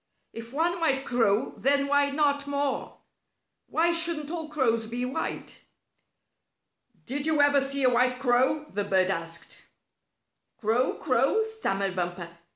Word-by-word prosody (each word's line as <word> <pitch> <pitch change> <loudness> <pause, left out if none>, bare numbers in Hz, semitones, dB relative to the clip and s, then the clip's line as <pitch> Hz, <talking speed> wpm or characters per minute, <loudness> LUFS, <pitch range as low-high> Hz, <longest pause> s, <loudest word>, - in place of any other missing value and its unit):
If 230 +1 -9
one 340 +5 0
white 275 -5 +1
crow, 225 -4 +1
then 280 +1 +2
why 285 0 +2
not 285 -1 +1
more? 280 -1 -2 0.7
Why 335 +2 +2
shouldn't 335 -3 -1
all 325 -3 -4
crows 230 -7 0
be 240 +2 -3
white? 255 - -5 1.4
"Did 280 +4 -2
you 315 -1 +2
ever 285 -1 +5
see 275 0 0
a 255 - +5
white 250 +1 +2
crow?" 260 +4 +1
the 205 +1 -2
bird 190 -1 +2
asked. 165 -1 -4 1.0
"Crow! 230 +4 +1
Crow!" 275 - +1
stammered 200 - -2
Bumper. 175 -1 -3
270 Hz, 135 wpm, -27 LUFS, 230-295 Hz, 1.4 s, ever